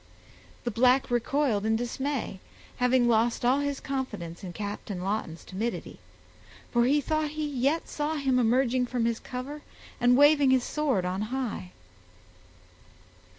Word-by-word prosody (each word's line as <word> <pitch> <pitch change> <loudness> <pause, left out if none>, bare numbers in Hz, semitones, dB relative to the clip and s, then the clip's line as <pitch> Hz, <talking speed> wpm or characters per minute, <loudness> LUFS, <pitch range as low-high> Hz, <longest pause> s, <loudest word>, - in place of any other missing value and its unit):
The 240 - -2
black 250 +4 +3
recoiled 240 -2 +1
in 220 +1 +2
dismay, 245 -2 -3 0.4
having 250 0 +3
lost 230 +1 +2
all 260 +3 +4
his 285 -1 -2
confidence 210 -11 -5
in 180 - -5
Captain 200 -1 -5
Lawton's 190 -5 -3
timidity; 220 +5 -4 0.7
for 240 -1 +3
he 285 +4 +3
thought 310 +1 -1
he 310 - -1
yet 285 +4 0
saw 300 +1 -2
him 270 -4 +1
emerging 250 +1 +2
from 240 -2 -1
his 230 -1 0
cover 270 +4 -6 0.4
and 245 +1 +4
waving 290 -1 +6
his 260 -1 +4
sword 270 -13 0
on 185 +2 -2
high. 240 -8 -3
250 Hz, 140 wpm, -28 LUFS, 220-275 Hz, 0.7 s, waving